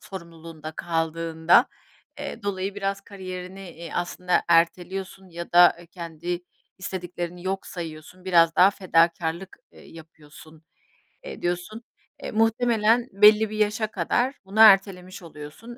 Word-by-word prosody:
sorumluluğunda 165 -3 -10
kaldığında, 165 0 +1 0.5
eee, 230 - -7
dolayı 195 0 -3
biraz 195 -1 -3
kariyerini, 185 -1 -9
eee, 170 0 -10
aslında 180 +1 -1
erteliyorsun 185 +3 0
ya 170 0 -8
da, 175 0 +7
eee, 175 - -14
kendi 170 0 -6 0.4
istediklerini 175 -2 -6
yok 190 +1 -3
sayıyorsun, 170 +1 -9
biraz 170 -3 +3
daha 185 +2 +7
fedakârlık, 170 -1 0
eee, - - -17
yapıyorsun, 155 0 -15 0.6
eee, - - -9
diyorsun. 175 +6 -4 0.4
Eee, - - -5
muhtemelen 225 +1 +2
belli 210 +2 +5
bir 215 - -6
yaşa 215 +1 0
kadar 240 - -1
bunu 200 +3 -5
ertelemiş 195 -3 +5
oluyorsun. 155 +10 -11
180 Hz, 120 wpm, -24 LUFS, 165-200 Hz, 0.6 s, da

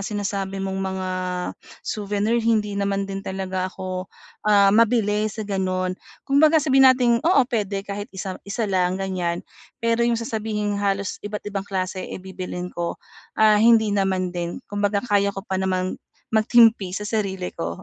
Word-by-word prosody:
sinasabi 195 -1 -3
mong 190 0 -3
mga 190 -1 -3 0.8
souvenir, 210 +2 0
hindi 220 -2 +1
naman 200 0 -1
din 195 0 -5
talaga 190 -1 -3
ako, 185 -1 -5 0.4
ah, 200 -1 +6
mabili 215 -1 +3
sa 215 +1 -6
gano'n. 185 -2 -1 0.3
Kumbaga 305 +3 +5
sabihin 270 -3 +6
nating 245 -2 +4
oo, 330 -2 +4
puwede 205 -5 -2
kahit 205 0 -5
isa 190 -1 -6
isa 200 +3 -3
lang, 185 -2 +1
ganyan. 180 -3 -2 0.3
Pero 230 0 0
'yong 235 - +2
sasabihing 215 -2 -2
halos 200 -1 -1
iba't-ibang 205 -1 -5
klase, 185 -1 -2
eh, - - -5
bibilhin 185 -1 -6
ko, 170 0 -3 0.4
ah, 215 -1 +5
hindi 220 -2 +5
naman 190 -2 0
din. 175 -1 -3
Kumbaga 205 0 -1
kaya 200 -3 +1
ko 195 - -5
pa 190 -2 -2
namang 185 -1 -1 0.3
magtimpi 220 -4 +4
sa 210 - -4
sarili 195 -4 -2
ko. 85 - -4
200 Hz, 150 wpm, -23 LUFS, 190-215 Hz, 0.8 s, ah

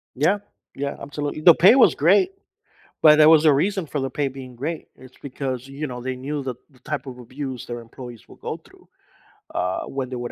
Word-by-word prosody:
Yeah, 175 +10 +2 0.4
yeah, 140 +1 -4
absolutely, 145 +1 -5
the 170 0 +8
pay 195 +7 +7
was 270 - +6
great, 380 0 +3 0.7
but 150 -1 +7
there 155 0 +7
was 160 -1 +6
a 150 - +7
reason 190 +4 0
for 145 -1 -4
the 135 0 -2
pay 140 +2 -1
being 130 -2 -9
great, 155 +6 -5
it's 130 0 -16
because, 130 -2 -5
you 145 +2 -5
know, 125 -1 -7
they 130 0 -3
knew 140 +2 -4
that 125 -2 -5
the 130 -3 -24
type 145 +2 -5
of 125 -2 -8
abuse 130 0 -7
their 120 0 -6
employees 120 0 -11
will - - -15
go - - -5
through, - - -22 0.7
uh, 90 +1 -1
when 135 -2 -4
they 130 - -5
would 120 0 -5
135 Hz, 215 wpm, -23 LUFS, 125-150 Hz, 0.7 s, the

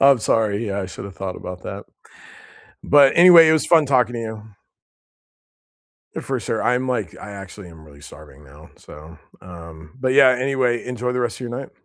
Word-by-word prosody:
I'm 135 -2 +5
sorry, 110 0 -1
yeah, 100 0 -3
I 95 - -5
should've 95 +2 -10
thought 95 -1 -6
about 90 0 -9
that. - - -8 1.0
But 140 -1 +5
anyway, 170 -2 +8
it - - +4
was 160 - 0
fun 160 -3 +4
talking 125 -3 +1
to 115 - -4
you. 110 -1 -7 1.8
For 130 -3 -4
sure, 110 +3 -3
I'm 125 +1 -1
like 110 -9 -3
I 105 - -10
actually 100 -1 -11
am 80 -2 -16
really 70 -2 -18
starving 75 -1 -15
now, 75 +3 -17
so, 80 +2 -15 0.2
um 85 -3 -13
But 130 0 0
yeah, 135 -2 +6
anyway, 130 -1 -1
enjoy 125 0 -4
the 125 - -2
rest 120 -2 -3
of - - -14
your 120 - -6
night. 130 +3 -7
115 Hz, 185 wpm, -20 LUFS, 90-130 Hz, 1.8 s, anyway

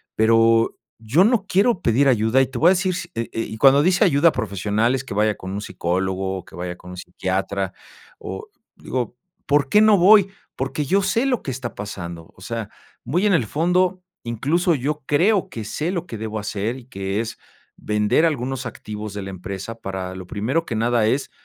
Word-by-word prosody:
pero, 115 +1 +4 0.2
yo 130 - +3
no 220 -3 +2
quiero 205 +2 +2
pedir 125 +5 +3
ayuda, 120 0 +3
y 135 - +2
te - - -7
voy 170 - +5
a - - +6
decir 185 -1 +1
si - - -5
eh, 115 0 -3
y 115 -1 -4
cuando 135 +4 +6
dice: 180 +1 +4
"Ayuda 145 +4 +4
profesional", 105 +5 0
es 130 - -3
que 130 - -7
vaya 105 0 +2
con 95 - -8
un 100 +1 -4
psicólogo, 95 0 -2
que - - -14
vaya 90 0 -5
con 90 - -12
un 90 - -9
psiquiatra, 95 +1 -3 0.5
o, - - -7 0.3
digo: 125 -2 -4 0.3
"¿Por 145 -1 +3
qué 210 - +5
no 215 -2 +6
voy?, 195 +2 +6 0.3
porque, 135 +3 -2
yo 195 +8 +2
sé 225 +6 +1
lo 255 -4 +1
que - - -5
está 120 -3 -5
pasando". 85 -5 -7
O - - -17
sea, 115 0 -5 0.3
muy 170 - 0
en 205 - +4
el 130 -10 +2
fondo, 180 - +1 0.2
incluso, 150 +10 +1
yo 145 +3 -2
creo, 185 +7 +2
que 115 - -6
sé 155 - -2
lo 175 -2 -3
que 115 - -6
debo 110 0 -4
hacer, 105 +3 -3
y 125 - -13
que 100 -5 -3
es 115 - -6 0.4
vender 105 +9 +2
algunos 135 -4 -2
activos 105 -2 -7
de 100 - -4
la 95 - -6
empresa, 95 +3 -6
para 95 -2 -5
lo 95 -1 -8
primero 125 - -1
que 115 - -4
nada 115 0 +2
es, 135 +5 0
115 Hz, 200 wpm, -22 LUFS, 105-160 Hz, 0.5 s, a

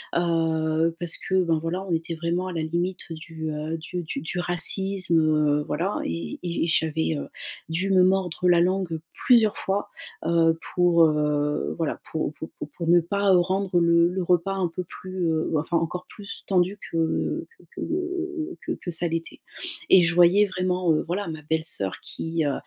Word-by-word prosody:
heu, 165 -1 +1
parce 175 -1 -1
que 190 -1 +1
ben 165 -2 +1
voilà 165 +4 -3
on 185 - -5
était 165 0 -2
vraiment 170 +3 -1
à - - -4
la 165 - -2
limite 175 +2 -2
du 160 -1 -6 0.3
du 175 +1 -5
du 140 -3 -4
du 175 +3 -4
racisme, 175 0 +1
heu, 150 -2 +2
voilà 190 +4 -1
et 85 0 -4
et 170 -1 -1
j'avais 160 0 +1 0.5
dû 180 +4 -1
me 185 -1 +6
mordre 180 -1 +2
la 175 - +6
langue 180 -2 0 0.3
plusieurs 230 -4 +5
fois, 195 +1 -2 0.4
heu, 165 -1 +3 0.2
pour, 175 -2 +5
heu 150 -1 0
voilà 165 -3 -2
pour 155 -2 -2
pour 160 +1 -8
pour 150 - -5
pour 170 +2 -5
ne 175 0 +7
pas 200 +3 +1
rendre, 185 +1 +2
heu, 175 - +4
le 170 0 +5
le 185 +1 -2
repas 180 +2 +2
un 190 -2 +1
peu 180 +2 -4
plus, 185 0 -4
heu, 160 0 -1
enfin 160 +3 0
encore 175 +2 -3
plus 200 -2 -9
tendu 185 0 +2 0.2
que 165 -1 0
que - - -19
que 355 -1 -3
que 335 - -2
que - - -4
ça 170 +1 +1
l'était 165 0 -4 0.5
et 185 - +8
je 170 - 0
voyais 180 +4 +6
vraiment, 180 -2 0
heu, 155 - +1
voilà, 185 +3 -2
ma 155 -1 -6
belle-soeur 150 - -1
qui, 165 -1 -3
heu, 140 - +1
170 Hz, 180 wpm, -25 LUFS, 160-185 Hz, 0.5 s, et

